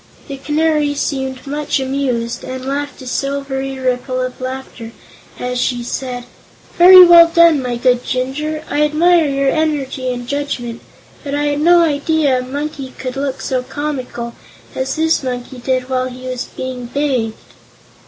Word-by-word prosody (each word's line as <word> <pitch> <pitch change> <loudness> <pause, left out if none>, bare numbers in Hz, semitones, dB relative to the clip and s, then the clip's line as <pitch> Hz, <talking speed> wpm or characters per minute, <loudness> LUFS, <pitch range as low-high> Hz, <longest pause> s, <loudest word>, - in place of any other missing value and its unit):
The 275 -2 -6
Canary 300 +1 +1
seemed 265 -2 -3
much 290 0 -1
amused 260 -3 -2
and 260 0 -6
laughed 285 0 -4
a - - -10
silvery 270 0 -3
ripple 255 0 -1
of 255 0 -4
laughter 255 -3 -6 0.4
as 250 0 -3
she 245 -2 -1
said: 250 0 -4 0.5
"Very 365 +1 +10
well 340 -1 +8
done, 335 -3 +5
my 250 -1 -2
good 245 0 +2
Jinjur; 300 +5 -3
I 295 - -1
admire 320 +2 +3
your 275 -1 +1
energy 280 -5 -1
and 245 -1 -6
judgment. 245 -4 -3 0.4
But 280 0 -3
I 290 - 0
had 290 0 -1
no 345 +2 +6
idea 295 -3 +1
a - - -2
monkey 275 +1 -5
could 255 -1 -5
look 275 -1 -3
so 255 -1 -1
comical 255 -3 -5 0.4
as 265 +1 -2
this 320 0 +1
monkey 250 0 -5
did 255 0 -1
while 255 -1 -1
he 255 +1 -10
was 255 -1 -3
being 255 -2 -6
bathed." 250 -5 -1
270 Hz, 155 wpm, -17 LUFS, 255-295 Hz, 0.5 s, Very